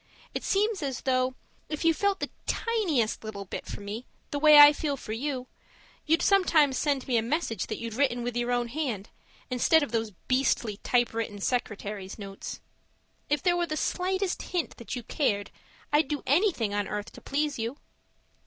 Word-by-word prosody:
It - - -3
seems 410 -1 +1
as 270 -3 -3
though, 255 -1 +1 0.3
if 305 +1 -3
you 330 - +6
felt 400 +3 0
the - - -3 0.2
tiniest 345 - 0
little 205 -2 -6
bit - - -6
for - - -6
me 210 +5 -6 0.2
the 285 - -1
way 305 0 +8
I 290 0 +11
feel 290 -2 -2
for 215 - -8
you, 255 +1 -3 0.6
you'd 325 +2 +3
sometimes 320 -9 +4
send 285 -3 0
me 245 -3 +2
a - - +3
message 230 - -1
that 215 - -3
you'd 230 -1 -5
written 245 -1 +1
with 245 0 -3
your 240 0 0
own 240 -1 0
hand, 240 -8 -3 0.4
instead 295 +5 +4
of 285 - -4
those 225 -1 0 0.2
beastly 255 -5 +1
typewritten 230 -3 0
secretary's 205 -4 -3
notes. 195 -2 -7 0.7
If 295 -1 +1
there 355 -1 +3
were 350 -1 0
the 310 - -3
slightest 375 +2 -1
hint 350 -3 -3
that 235 - -6
you 245 - -5
cared, 205 -7 -1 0.4
I'd 295 -1 +4
do 290 0 -3
anything 285 - +2
on 205 -1 -1
earth 210 +1 -4
to - - -13
please 290 -1 -1
you. 230 +5 -3
260 Hz, 180 wpm, -28 LUFS, 225-310 Hz, 0.7 s, I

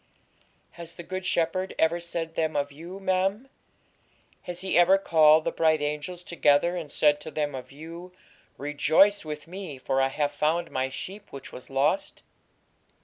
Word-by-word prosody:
'Has 170 -1 -7
the 175 - -9
Good 185 +1 -4
Shepherd 185 +2 0
ever 165 +2 +2
said 170 -1 -4
them 160 -1 -1
of 145 0 -1
you, 170 +7 -9
ma'am? 195 +5 0 0.9
Has 175 0 -6
He 190 0 -1
ever 175 +3 +6
called 155 -4 +5
the - - -1
bright 160 -1 +2
angels 150 +4 -4
together 170 0 +2
and 160 -5 -5
said 150 0 +3
to 155 - -7
them 150 -1 -2
of 130 -1 -8
you, 165 +5 -10 0.5
"Rejoice 155 +8 +3
with 150 -1 -6
Me, 180 -5 -7
for 135 +1 0
I 135 - +3
have 145 +2 -1
found 155 +4 0
My 130 0 -1
sheep 195 +10 -7
which 140 - -9
was 125 - -10
lost"?' 140 - 0
160 Hz, 165 wpm, -27 LUFS, 145-180 Hz, 0.9 s, ever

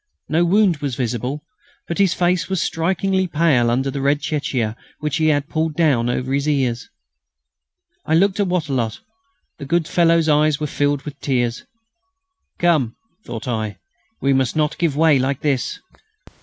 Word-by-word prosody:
No 165 +2 +2
wound 185 -1 +3
was 140 -4 -3
visible, 125 +4 -3 0.4
but 170 - -4
his 195 -3 +3
face 180 0 +1
was 190 -2 0
strikingly 190 +3 0
pale 150 -8 +2
under 135 +3 0
the 140 - -4
red 140 +1 +2
chéchia 130 -8 -2 0.2
which 150 +1 -2
had 155 -3 +2
been 145 - -31
pulled 160 -1 0
down 140 -8 +2
over 130 +2 -2
his 140 +2 0
ears. 130 -5 -1 1.1
I 160 - +1
looked 195 +4 +2
at 200 - +2
Wattrelot. 140 -11 -1 0.6
The - - -6
good 165 +2 0
fellow's 165 -2 +3
eyes 150 0 +3
were 155 - -2
filled 145 -1 0
with 145 -2 -8
tears. 120 -3 -1 0.9
"Come!" 155 -10 +2 0.3
thought 115 +1 -6
I, 110 -4 -2 0.4
"we 135 0 +2
must 130 0 +1
not 150 -1 0
give 165 -5 +1
way 155 -3 +4
like 135 +1 -1
this." 135 -4 -1
150 Hz, 160 wpm, -20 LUFS, 130-165 Hz, 1.1 s, way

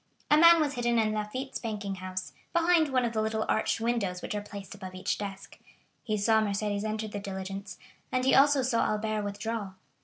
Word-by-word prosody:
A - - +8
man 335 +1 +8
was 295 -2 +1
hidden 240 -2 +1
in 215 -1 +2
Lafitte's 215 +6 -4
banking 210 -4 -4
house, 185 0 -5 0.2
behind 335 -2 +4
one 255 -2 +2
of 235 - -2
the 220 - 0
little 220 0 -1
arched 220 - +1
windows 225 -6 -1
which - - -4
are 210 - -2
placed 200 -2 -9
above 190 -2 -9
each 185 - -2
desk; 195 -1 -7 0.4
he 215 -3 -1
saw 220 +2 +3
Mercédès 205 0 -1
enter 215 0 -2
the 205 -1 -5
diligence, 195 0 -6 0.3
and 255 0 0
he 265 - +4
also 280 0 +5
saw 245 -2 +2
Albert 215 0 -1
withdraw. 205 0 -4
215 Hz, 195 wpm, -29 LUFS, 200-240 Hz, 0.4 s, A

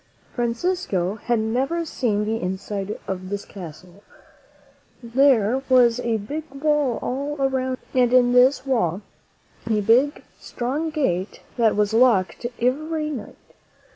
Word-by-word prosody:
Fran 235 -2 -1
cisco 235 - -1
had 240 +2 0
never 260 +10 -1
seen 215 -9 -1
the 225 +1 -2
inside 195 +2 -4
of 185 -1 -4
this 200 0 -4
castle. 180 +1 -11 1.0
There 245 -1 +3
was 250 -2 +5
a 235 -2 0
great 295 +9 -6
wall 295 -4 +1
all 280 +3 -3
around 260 -1 0 0.2
it, 255 - +1
and 245 -1 +3
in 245 -1 +4
this 255 +2 +4
wall 205 -8 0 0.7
a 215 -1 +2
big, 245 +8 +2 0.2
strong 280 +7 -3
gate 215 - -2
that 225 -3 +2
was 210 +1 +1
locked 230 -2 +3
every 305 +5 -1
night. 245 -8 -7
240 Hz, 135 wpm, -23 LUFS, 210-275 Hz, 1.0 s, was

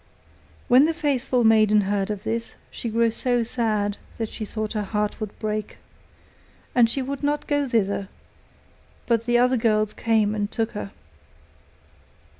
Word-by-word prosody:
When 255 +4 +6
the 325 0 0
faithful 265 -6 0
maiden 215 -1 +5
heard 200 0 -1
of 205 -2 -4
this, 230 0 -3 0.2
she 235 - -5
grew 230 +1 +2
so 245 +1 +1
sad 215 -4 -1 0.2
that 225 -2 -3
she 215 - -6
thought 215 +1 -4
her 215 - -1
heart 210 +1 -2
would 215 -1 -5
break, 215 -1 -4 1.0
and 240 -2 +5
she 270 +3 -1
would 275 +1 -5
not 290 0 -1
go 290 -1 0
thither, 200 -4 0 1.0
but 230 -1 +1
the 240 0 +4
other 250 +1 +3
girls 215 -2 +1
came 220 -2 +1
and 205 -1 -2
took 225 0 -2
her. 210 -2 -5
225 Hz, 155 wpm, -24 LUFS, 210-245 Hz, 1.0 s, When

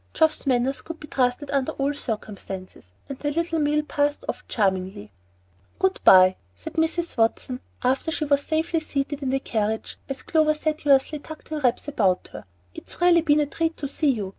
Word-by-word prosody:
Geoff's 315 -2 +2
manners 260 +1 +1
could 330 0 -8
be - - -9
trusted 260 +1 0
under 275 -2 0
all 280 +1 -1
circumstances, 195 - -7
and 275 - -7
the 290 - -1
little 330 +2 -1
meal 300 0 +2
passed 290 0 -1
off - - -4
charmingly. 190 - -1 0.7
"Good 190 0 +1
by," 185 0 +7 0.2
said 90 - -8
Mrs. 335 0 -1
Watson, 235 +2 0 0.2
after 260 +5 +1
she 315 -1 -1
was 285 -1 +2
safely 320 +2 0
seated 290 -1 -3
in 270 - -1
the 270 +1 +1
carriage, 220 -3 -2
as 270 -1 -5
Clover 310 -1 +2
sedulously 300 -2 +1
tucked 315 +2 -11
her 310 -1 -3
wraps 255 0 0
about 195 -10 +1
her. - - -9 0.3
"It's - - -11
really 350 -1 +5
been 300 -1 +3
a - - +2
treat 325 +3 -2
to 285 - -3
see 290 +2 +1
you. 210 -7 -1
280 Hz, 185 wpm, -24 LUFS, 235-310 Hz, 0.7 s, by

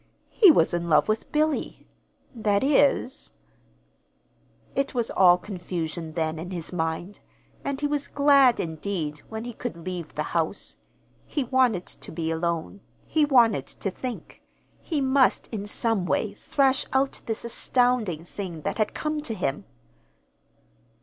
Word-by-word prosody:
He 410 -5 +7
was 170 - +4
in 170 0 -1
love 150 - +4
with 215 0 -1
Billy; 305 0 0 0.5
that 210 -3 +1
is 275 -1 +2 1.4
It 275 -1 -1
was 235 -2 0
all 180 -2 +6
confusion 170 -4 -5
then, 160 -1 -1
in 175 +2 -6
his 175 -2 -6
mind, 165 +3 -3 0.4
and 280 -1 -2
he 295 - -1
was 290 -1 -1
glad 280 -4 +5
indeed 160 -2 -3
when 220 0 -5
he 240 0 -6
could 220 -8 -6
leave 180 -4 -5
the - - -1
house. - - -1 0.5
He 290 - -1
wanted 250 -7 +2
to - - -8
be 160 0 -2
alone. 170 +3 -2 0.2
He 310 -2 +2
wanted 240 -7 +4
to 195 - -4
think. 250 +5 -7 0.4
He 310 -5 -2
must, 265 0 +3
in 205 -3 -5
some 210 -3 0
way, - - 0
thrash 270 -2 +2
out 270 +1 +1
this 225 0 -3
astounding 235 -8 +1
thing 175 -4 -6
that - - -3
had 215 - 0
come 305 0 -2
to 235 -7 -2
him. 175 -8 -2
215 Hz, 145 wpm, -26 LUFS, 175-265 Hz, 1.4 s, He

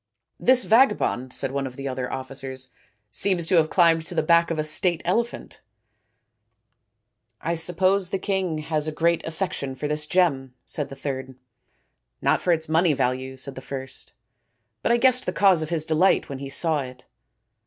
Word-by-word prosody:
" - - -55
This 255 -1 +6
vagabond," 215 - +2
said 130 - -1
one 140 0 -2
of 125 - -10
the 140 +1 -5
other 130 -1 -4
officers, 130 0 -7 0.2
" 105 -1 -46
seems 180 - +1
to 175 +2 +2
have 155 -1 +3
climbed 165 -3 +3
to 175 - -6
the - - +1
back 170 +1 +4
of 165 - -2
a 155 - 0
state 160 +2 +2
elephant." 230 +7 -2 0.9
" - - -52
I 165 +2 -1
suppose 180 +3 +2
the 195 - -1
king 190 -4 -2
has 155 0 -2
a - - -1
great 170 +2 +1
affection 160 -5 -4
for 140 +3 -4
this 150 0 -2
gem," 140 -9 +1
said 145 - -3
the 135 - -8
third. 130 -1 -5 0.4
" - - -46 0.3
Not - - +1
for 180 - +1
its 160 -1 0
money 160 +1 +3
value," 130 0 -2
said 135 +1 -6
the 130 - -9
first, 135 -1 -7 0.3
" - - -51
but - - +1
I 235 - +4
guessed 255 0 +2
the - - +1
cause 190 -5 +4
of 155 - -4
his 165 -3 -1
delight 160 +4 +2
when 135 -1 -6
he 140 0 -6
saw 155 +1 +1
it." 125 -1 -9
155 Hz, 195 wpm, -24 LUFS, 135-175 Hz, 0.9 s, This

